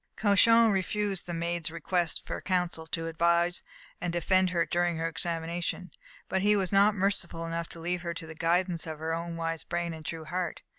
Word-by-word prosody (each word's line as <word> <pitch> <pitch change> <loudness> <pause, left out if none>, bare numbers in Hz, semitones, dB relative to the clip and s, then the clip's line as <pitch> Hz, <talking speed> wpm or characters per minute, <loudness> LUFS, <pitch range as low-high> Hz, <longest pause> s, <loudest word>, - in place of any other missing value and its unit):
Cauchon 225 +2 +5
refused 195 0 -1
the 175 - -3
Maid's 170 -1 -1
just 160 - -5
request 170 +1 -1
for - - -4
counsel 180 -3 -1
to 165 0 -3
advise 170 +2 +2 0.4
and 175 - -1
defend 185 +2 +2
her 170 -2 +1
during 175 -1 0
her 165 +1 -1
examination. 170 +2 -3 0.4
But 190 - 0
he 210 +1 +4
was 190 -3 0
not 200 +1 +5
merciful 185 -4 -1
enough 165 0 -3
to 170 - -8
leave 175 +2 -2
her 170 -1 -4
to 165 - -5
the 160 - -8
guidance 170 +1 0
of 155 -1 -5
her 160 +1 -2
own 170 0 -4
wise 165 -1 -2
brain 170 0 -2
and 160 -1 -9
true 160 0 -5
heart. 180 +2 -3
170 Hz, 200 wpm, -29 LUFS, 165-185 Hz, 0.4 s, Cauchon